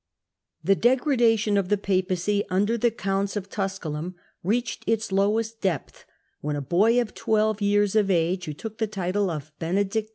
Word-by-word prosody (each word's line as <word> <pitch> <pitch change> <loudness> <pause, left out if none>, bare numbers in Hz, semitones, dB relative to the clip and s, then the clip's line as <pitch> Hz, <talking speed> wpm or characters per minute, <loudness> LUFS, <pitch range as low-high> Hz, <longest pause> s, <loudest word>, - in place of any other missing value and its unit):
The 195 +5 +4
degradation 235 -4 +3
of 190 -2 0
the 205 - +3
Papacy 190 +1 0
under 205 +5 +1
the 235 +1 +2
counts 195 -2 -2
of 200 -1 -5
Tusculum 180 -4 -3 0.3
reached 225 +6 -1
its 225 -2 0
lowest 215 +3 +1
depth 180 -8 -3 0.3
when 150 0 -2
a - - -2
boy 200 - +3
of 235 -3 -2
twelve 215 -1 +1
Degradation 205 -1 0
years 205 0 +2
of 210 -2 +3
age, 180 +1 +1
who 150 - -4
took 220 +6 -8
the 220 - +1
title 195 -1 -1
of 155 -2 -5
Benedict 200 +5 0
IX. - - -31
200 Hz, 175 wpm, -25 LUFS, 185-220 Hz, 0.3 s, The